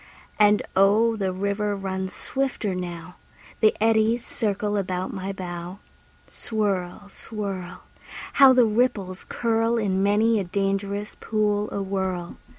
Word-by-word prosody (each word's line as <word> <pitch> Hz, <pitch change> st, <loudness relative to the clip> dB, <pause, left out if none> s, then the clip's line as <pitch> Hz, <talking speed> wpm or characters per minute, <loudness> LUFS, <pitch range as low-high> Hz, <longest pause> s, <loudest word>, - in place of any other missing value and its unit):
And 210 Hz, 0 st, +5 dB
oh, 215 Hz, +4 st, +4 dB
the 195 Hz, -3 st, -1 dB
river 200 Hz, +2 st, -1 dB
runs 190 Hz, -1 st, -4 dB
swifter 265 Hz, -7 st, -2 dB
now; 180 Hz, -1 st, -6 dB, 0.4 s
The 215 Hz, -1 st, +4 dB
eddies 225 Hz, +2 st, +2 dB
circle 210 Hz, -2 st, -1 dB
about 185 Hz, -2 st, -2 dB
my 195 Hz, -1 st, -4 dB
bow. 175 Hz, -1 st, -6 dB, 0.5 s
Swirl, 200 Hz, -3 st, -2 dB
swirl! 195 Hz, -3 st, -6 dB, 0.5 s
How 275 Hz, -1 st, +8 dB
the 250 Hz, -2 st, +5 dB
ripples 210 Hz, -5 st, 0 dB
curl 230 Hz, 0 st, +1 dB
In 195 Hz, -4 st, 0 dB
many 215 Hz, +3 st, +3 dB
a -, -, -1 dB
dangerous 195 Hz, +2 st, -2 dB
pool 210 Hz, -1 st, 0 dB
awhirl! 190 Hz, -3 st, -3 dB
200 Hz, 120 wpm, -24 LUFS, 190-220 Hz, 0.5 s, How